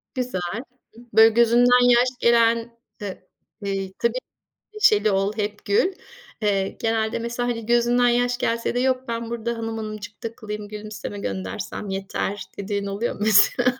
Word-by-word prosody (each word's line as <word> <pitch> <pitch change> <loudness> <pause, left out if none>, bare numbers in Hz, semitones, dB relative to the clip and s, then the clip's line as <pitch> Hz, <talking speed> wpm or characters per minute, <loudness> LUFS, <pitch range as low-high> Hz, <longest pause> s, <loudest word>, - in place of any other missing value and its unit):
Güzel, 225 -4 -3 0.5
böyle, 220 0 +8
gözünden 245 +2 +5
yaş 245 +1 +5
gelen 235 -1 +4 0.5
ııı, 195 -2 -4 0.5
eee, 195 -1 -2
tabii 235 +2 +1 0.6
neşeli 215 - +4
ol 195 +1 +1
hep 210 0 -3
gül. 210 - +2 0.5
Eee, 195 -2 +1
genelde 225 0 0
mesela, 235 +1 -2
hani, 230 -2 -3
gözünden 240 +1 +3
yaş 245 +1 +1
gelse 230 0 -1
de - - +1
"Yok, 260 0 0
ben 230 0 -3
burada 235 0 -3
hanım 225 0 -4
hanımcık 215 -1 -7
takılayım. 210 -2 -6
Gülümseme 210 -1 -7
göndersem 95 - -5
yeter." 195 +1 -3
dediğin 200 0 -3
oluyor 200 +4 -2
mu - - -14
mesela? 240 +4 +4
225 Hz, 145 wpm, -23 LUFS, 205-240 Hz, 0.6 s, böyle